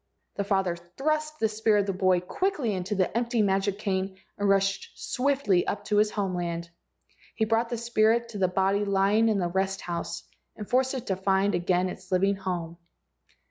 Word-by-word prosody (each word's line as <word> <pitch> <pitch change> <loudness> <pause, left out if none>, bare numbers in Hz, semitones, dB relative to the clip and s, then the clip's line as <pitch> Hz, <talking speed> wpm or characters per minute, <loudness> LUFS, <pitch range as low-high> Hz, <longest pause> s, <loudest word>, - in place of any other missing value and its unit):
The 200 - 0
father 195 -3 +1
thrust 305 - -2
the 220 - +3
spirit 215 -1 +2
of - - -3
the 195 - -1
boy 185 -1 +2
quickly 285 - -1
into 185 +2 -2
the 185 +1 0
empty 235 -1 +1
magic 195 0 +1
cane 190 -2 -2 0.2
and 205 0 0
rushed 195 0 +1
swiftly 250 -9 +1
up 205 0 -3
to 210 0 +1
his 210 0 +4
home 200 -3 -2
land. 170 -1 -3 0.6
He 220 - +1
brought 225 +1 +1
the 240 - -2
spirit 235 0 +2
to 210 -3 -6
the 185 - +3
body 195 +2 +1
lying 200 +3 +3
in 215 - +2
the 180 -3 0
rest 190 +2 -1
house 170 0 -4 0.3
and 210 -2 -7
forced 260 +1 +1
it 255 -2 -5
to 190 - 0
find 195 +1 +1
again 180 +1 +1
its 185 +1 -9
living 195 +2 +2
home. 175 -3 -4
195 Hz, 190 wpm, -27 LUFS, 185-220 Hz, 0.6 s, his